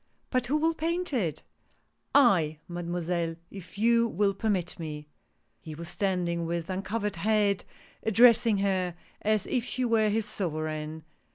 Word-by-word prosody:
" - - -43
But 255 -2 +1
who 290 +4 +2
will 325 +2 +2
paint 335 +1 -2
it? 170 - -1 0.2
" - - -40
" - - -19 0.2
I, 155 -2 -2
Mademoiselle, 175 -1 -2 0.2
if 190 -1 -10
you 235 +2 +4
will 200 -1 +1
permit 195 -5 -2
me! 150 -2 -6 0.3
" 110 0 -45
He 155 +4 -8
was 170 +2 -6
standing, 175 -3 -1
with 170 +1 -3
uncovered 205 +1 -2
head, 205 0 +2 0.4
addressing 230 0 +5
her 190 -3 0 0.3
as 215 -2 +1
if 250 -3 0
she 255 +1 -2
were 225 -2 +3
liis 220 +2 +1
sovereign. 155 -6 -4
195 Hz, 160 wpm, -28 LUFS, 170-225 Hz, 0.4 s, addressing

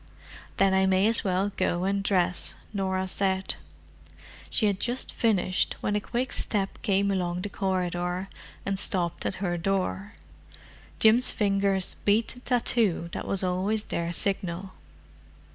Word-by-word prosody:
"Then 195 -1 +4
I 190 0 +3
may 190 +1 +3
as 225 +1 +1
well 190 +1 0
go 175 +1 0
and 195 +1 +1
dress," 180 -3 +1 0.2
Norah 190 -1 -1
said. 190 0 0 1.0
She 220 - +2
had 200 -2 +1
just 245 +2 -1
finished 195 -5 +1
when 205 - -1
a 210 - +1
quick 250 +4 -2
step 195 -3 -1
came 200 0 +2
along 180 -2 -1
the 205 - -3
corridor, 180 -1 -1 0.4
and 195 -1 -1
stopped 175 -5 0
at - - -2
her 175 -1 -1
door. 195 +2 -1 0.8
Jim's 225 +3 +5
fingers 195 -2 +1
beat 210 +2 +3
the 245 - -8
tattoo 230 -8 +1
that - - -5
was 195 -1 -1
always 190 +4 0
their 170 -4 -3
signal. 190 0 -2
195 Hz, 145 wpm, -27 LUFS, 185-205 Hz, 1.0 s, Jim's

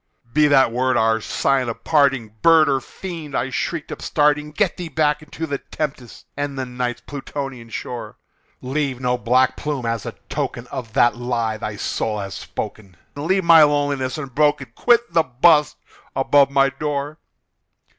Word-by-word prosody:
"Be 150 0 +5
that 135 -4 +4
word 130 +1 +1
our 110 0 +2
sign 130 +2 0
of 115 - -7
parting, 135 -8 +2
bird 165 -2 +6
or 135 -1 +2
fiend!" 165 -1 -8
I 130 - -1
shrieked, 150 +5 -3
upstarting 150 0 +1
"Get 180 +5 0
thee 175 - -5
back 150 0 +1
into 150 +2 -6
the 140 -3 -3
tempest 135 -6 -6
and 145 -1 -3
the 130 - -2
Night's 125 -1 -4
Plutonian 135 -3 -6
shore! 120 +1 -6 0.4
Leave 135 -1 -2
no 125 -1 0
black 125 +1 +2
plume 145 -5 -3
as 115 -2 -2
a - - -6
token - - -3
of 115 -3 -6
that 120 +2 +3
lie 120 -3 -1
thy 105 -1 -5
soul 105 +1 -2
hath 100 -2 -5
spoken! 95 +2 -7 0.2
Leave 185 +7 0
my 165 -1 +8
loneliness 145 -3 +1
unbroken! 140 -2 0
quit 235 - +2
the 165 - +5
bust 150 +3 +3 0.4
above 140 +1 +4
my 140 0 +3
door! 145 +1 -4
135 Hz, 160 wpm, -21 LUFS, 125-150 Hz, 0.4 s, my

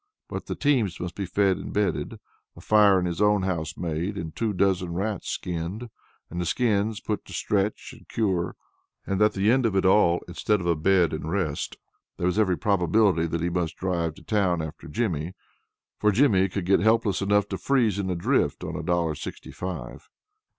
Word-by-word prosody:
Both - - -6
the - - -3
teams 120 - +1
must 90 0 -4
be 100 -2 -4
fed 95 0 +2
and - - -7
bedded, 100 -5 -1 0.4
a - - -12
fire 105 -3 +5
in 90 - -1
his 85 +2 -2
own 105 -2 +3
house 80 -4 -2
made, 85 +4 -3
and 80 -3 -6
two 110 +5 0
dozen 95 -2 +1
rats 100 +1 -2
skinned, 90 +7 -4 0.4
and 85 +1 -4
the - - -2
skins 110 -1 +1
put - - -3
to - - -11
stretch 100 0 -1
and - - -19
cure. 95 -6 -1 0.5
And 100 +1 -1
at 105 0 +4
the 100 +3 +2
end 130 -1 +3
of 100 - -2
it 95 - +2
all, 95 -3 +4
instead 105 +4 0
of 90 - -5
a 85 -1 +2
bed 90 +1 +3
and 80 0 -4
rest, 80 -6 -2 0.4
there 90 - -2
was 90 +4 +1
every 95 -5 +2
probability 95 -3 +2
that 80 0 -2
he 85 - 0
must 85 -2 -2
drive 85 -4 -1
to - - -15
town 95 -5 +1
after 80 -1 -6
Jimmy; 85 -2 -2 0.6
for 105 - +3
Jimmy 100 -5 +3
could 95 -1 -3
get 95 +2 +4
helpless 110 0 +2
enough 100 +1 +2
to 95 - -4
freeze 115 -8 +2
in 95 -2 -2
a 90 - 0
drift 85 - 0
on - - -4
a - - -3
dollar 85 -2 0
sixty - - -8
five. 90 0 -7
95 Hz, 200 wpm, -26 LUFS, 85-105 Hz, 0.6 s, fire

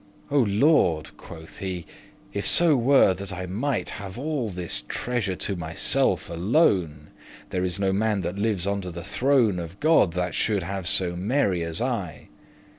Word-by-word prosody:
"O 145 - +3
Lord!" 100 - +2
quoth 80 0 -12
he, 90 -3 -4 0.5
"if 100 - -1
so 170 -3 +5
were 130 -5 +5
that 95 +1 -8
I 90 0 -5
might 120 +9 -2
Have 95 0 -8
all 140 -4 -2
this 90 -9 -4
treasure 120 -6 -2
to 100 - -3
myself 80 -2 0
alone, 85 - +1 0.4
There 90 - -1
is 90 +1 -1
no 95 -1 +1
man 105 0 +1
that 90 +1 -3
lives 100 -3 -1
under 100 -2 -2
the 85 -1 -7
throne 115 -1 +2
Of 85 +3 -8
God, 155 - +4
that 90 -1 -2
shoulde 100 -4 0
have 95 0 -4
so 90 -1 +1
merry 95 -1 0
as 85 +2 -3
I." 95 - -4
95 Hz, 165 wpm, -25 LUFS, 90-115 Hz, 0.5 s, so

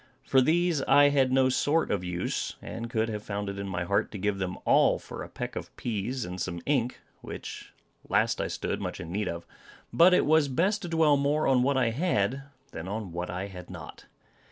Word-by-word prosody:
For 130 - +4
these 165 +1 +2
I 145 0 +7
had 135 -2 +2
no 130 0 +4
sort 150 +5 +1
of 95 -3 0
use, 90 0 -3
and 115 +1 -6
could 115 -1 0
have 105 -1 -4
found 100 -1 -4
it 100 0 -5
in 100 - -4
my 90 -2 -2
heart 100 +3 0
to - - -4
give 100 0 -1
them 95 -1 -3
all - - +4
for - - -9
a - - -7
peck - - -6
of - - -5
peas 120 +2 -3
and 90 0 -6
some 85 -1 -3
ink, 130 -4 0 0.2
which - - -8 0.4
last - - +2
I - - -1
stood - - -3
much - - -4
in 80 - -7
need 105 +3 -1
of. 85 0 -5 0.5
But 180 +2 +7
it - - +3
was 155 -1 +4
best 185 +10 +1
to 180 - -5
dwell 160 -3 +4
more 145 +2 +1
on 130 -2 +4
what 135 +2 +2
I 120 -3 +2
had, 130 - 0 0.3
than 85 +2 -7
on 100 -2 -4
what 90 +1 -4
I 90 +2 -3
had 90 -3 -10
not. - - -10
115 Hz, 220 wpm, -28 LUFS, 95-145 Hz, 0.5 s, I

